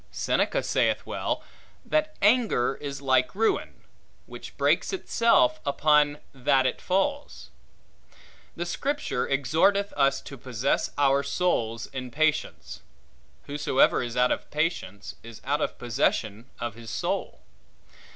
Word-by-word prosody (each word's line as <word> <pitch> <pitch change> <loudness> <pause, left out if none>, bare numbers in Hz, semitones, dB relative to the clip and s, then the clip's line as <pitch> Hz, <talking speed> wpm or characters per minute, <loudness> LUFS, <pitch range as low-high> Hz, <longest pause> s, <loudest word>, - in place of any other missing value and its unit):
Seneca - - 0
saith - - +1
well, - - -3 0.4
That 310 0 0
anger 210 - +3
is 140 -1 -6
like 130 +3 +2
ruin, 225 +2 -1 0.4
which - - -11
breaks - - +2
itself 230 - +2
upon 145 0 +3 0.2
that 135 0 +2
it 130 - -1
falls. 280 +11 -2 1.0
The 175 - -3
Scripture 215 - -2
exhorteth 160 - +2
us 140 -1 +2
to 140 - -10
possess 130 +1 -1
our 140 -1 +3
souls 120 -7 -1
in 130 -2 -7
patience. 155 +3 -1 0.6
Whosoever 145 -2 +2
is 120 0 -5
out 125 0 +3
of - - -3
patience, 150 - -3
is 115 -1 -11
out 145 +2 0
of - - -2
possession 115 -1 -1
of 120 -2 -3
his 115 +1 -11
soul. - - -3
140 Hz, 120 wpm, -26 LUFS, 125-175 Hz, 1.0 s, anger